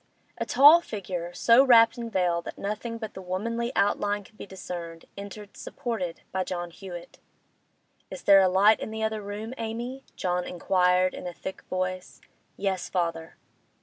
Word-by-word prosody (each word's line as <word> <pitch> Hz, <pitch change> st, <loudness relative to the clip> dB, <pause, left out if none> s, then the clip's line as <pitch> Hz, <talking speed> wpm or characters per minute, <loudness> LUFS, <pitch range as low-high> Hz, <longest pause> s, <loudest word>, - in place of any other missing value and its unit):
A -, -, -2 dB
tall 295 Hz, +5 st, +8 dB
figure, 180 Hz, -, -5 dB
so 230 Hz, +8 st, +5 dB
wrapped 230 Hz, -4 st, +6 dB
and 235 Hz, -2 st, -6 dB
veiled 175 Hz, -3 st, 0 dB
that -, -, -7 dB
nothing 215 Hz, +3 st, -4 dB
but 220 Hz, -2 st, -7 dB
the 190 Hz, -, -8 dB
womanly 230 Hz, +6 st, -3 dB
outline 205 Hz, 0 st, +1 dB
could 215 Hz, -, -20 dB
be 215 Hz, -, -9 dB
discerned, 175 Hz, -3 st, -8 dB
entered, 200 Hz, +1 st, -9 dB
supported 225 Hz, -10 st, -5 dB
by 190 Hz, 0 st, -1 dB
John 175 Hz, -1 st, -5 dB
Hewett. 175 Hz, -1 st, -10 dB, 0.9 s
'Is -, -, -8 dB
there 195 Hz, -1 st, +7 dB
a 190 Hz, -, +4 dB
light 200 Hz, +4 st, +5 dB
in -, -, -5 dB
the 220 Hz, 0 st, -4 dB
other 220 Hz, -1 st, -1 dB
room, 210 Hz, +3 st, -6 dB
Amy?' 240 Hz, +4 st, -5 dB
John 180 Hz, 0 st, -1 dB
inquired 180 Hz, +1 st, +2 dB
in -, -, -7 dB
a 175 Hz, -, -5 dB
thick 190 Hz, +2 st, -7 dB
voice. 185 Hz, 0 st, -3 dB, 0.4 s
'Yes, 190 Hz, -2 st, -2 dB
father. 165 Hz, -3 st, -2 dB
195 Hz, 165 wpm, -27 LUFS, 180-220 Hz, 0.9 s, tall